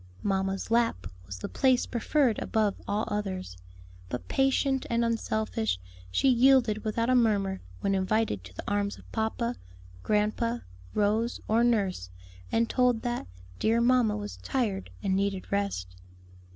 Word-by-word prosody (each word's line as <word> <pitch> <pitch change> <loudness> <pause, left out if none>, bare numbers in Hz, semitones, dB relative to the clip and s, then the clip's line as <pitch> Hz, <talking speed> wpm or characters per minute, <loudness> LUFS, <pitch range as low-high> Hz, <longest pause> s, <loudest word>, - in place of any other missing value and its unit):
"Mamma's 195 +1 -1
lap" 230 - +2 0.2
was 95 -1 -6
the - - -5
place 260 -2 +2
preferred 245 0 +1
above 215 -2 +1
all 210 +2 0
others; 190 - -3 0.5
but 125 - -5
patient 270 0 +1
and 235 0 +2
unselfish, 215 - -1 0.3
she 90 - +2
yielded 245 -4 +4
without 230 +2 0
a - - +4
murmur 205 -6 +2 0.2
when 195 - +1
invited 190 - 0
to 90 - -12
the - - -6
arms 205 0 0
of - - -17
papa, 235 +2 -1 0.4
grandpa, 215 - +1 0.4
Rose, 215 +3 +1
or 225 +2 +3
nurse, 200 - +1 0.4
and 230 0 +2
told 250 -3 +2
that 240 - -2 0.3
"dear 225 +2 +3
mamma 235 -3 +3
was 205 0 -6
tired 215 -8 -2
and 190 -2 +1
needed 195 -1 -1
rest." 195 - -2
215 Hz, 140 wpm, -28 LUFS, 195-235 Hz, 0.5 s, yielded